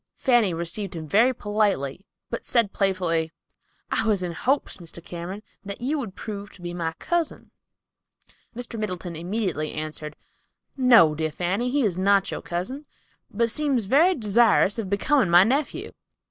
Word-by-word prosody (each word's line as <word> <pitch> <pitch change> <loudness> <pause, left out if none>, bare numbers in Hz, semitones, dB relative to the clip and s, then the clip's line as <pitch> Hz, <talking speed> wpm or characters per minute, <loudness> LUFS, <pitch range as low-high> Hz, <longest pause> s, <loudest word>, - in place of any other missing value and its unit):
Fanny 240 -7 +3
received 170 +3 -3
him 160 -1 -6
very 225 - +4
politely, 205 - -1 0.2
but 235 - -3
said 230 -5 +1
playfully, 175 -5 0 0.6
"I 225 - +1
was 200 -4 +2
in 175 - -2
hopes, 265 - 0
Mr. 170 -2 -9
Cameron, 180 +4 -6 0.2
that 200 -1 -6
you 280 +5 -1
would 220 -8 -6
prove 205 -2 -6
to 185 - -16
be 175 0 -4
my 165 -2 -2
cousin." 340 - -2 1.0
Mr. 235 -1 -5
Middleton 180 -5 -4
immediately 175 -2 -2
answered, 155 -1 -5 0.6
"No, 240 - +6
dear 155 +1 -2
Fanny, 190 +10 -1
he 280 +2 +1
is 185 -5 0
not 195 0 +3
your - - -4
cousin, 255 - -4 0.4
but 230 +3 -1
he 230 - +2
seems 270 -3 0
very 320 - +4
desirous 220 - +3
of 205 -4 -3
becoming 205 +3 +2
my 175 +2 +8
nephew." 270 +7 -1
200 Hz, 160 wpm, -25 LUFS, 175-235 Hz, 1.0 s, my